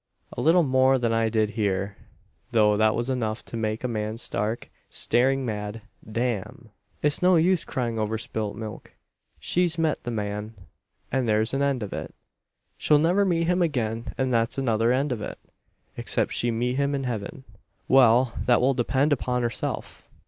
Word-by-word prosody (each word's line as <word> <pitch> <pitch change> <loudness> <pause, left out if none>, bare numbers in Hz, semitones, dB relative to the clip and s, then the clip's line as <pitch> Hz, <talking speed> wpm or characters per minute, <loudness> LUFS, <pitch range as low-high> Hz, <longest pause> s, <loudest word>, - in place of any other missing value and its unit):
A - - -4
little 170 +3 +5
more 130 -1 +4
than 115 -2 0
I 115 0 +2
did 110 -1 +1
hear; 100 -2 -1 0.5
though 105 -2 +4
that 110 +1 +3
was 120 +1 -2
enough 110 -4 -2
to - - -8
make 110 0 -2
a - - 0
man 110 -1 -3
stark, 110 0 -3 0.2
staring 135 +2 +1
mad. 105 -1 -4 0.3
Damn! 115 -1 -3 0.3
"It's 150 0 +2
no 180 0 +5
use 170 +1 +3
crying 120 -4 -2
over 110 +1 -1
spilt 110 -3 -4
milk. 110 -1 -8 0.4
She's 175 -1 0
met 160 -2 0
the 120 - -4
man, 105 0 -4 0.6
and 130 -3 0
there's 110 +2 +1
an 135 - 0
end 140 -4 +1
of 100 - -6
it. - - -6 0.6
She'll 150 - +4
never 175 +7 +3
meet 170 -3 +1
him 180 +2 +1
again, 115 -8 -1
and 130 -1 0
that's 115 +2 +1
another 115 -3 +2
end 135 +3 +1
of 115 -4 -2
it - - -6 0.6
except - - -1
she 120 - 0
meet 120 +2 -1
him 140 0 +1
in 135 - -2
heaven. 120 0 -4 0.4
Well; 125 -2 +5
that 120 - +5
will 135 +2 +3
depend 135 +4 +1
upon 125 -2 -1
herself. 115 -2 -4
120 Hz, 175 wpm, -25 LUFS, 110-135 Hz, 0.6 s, little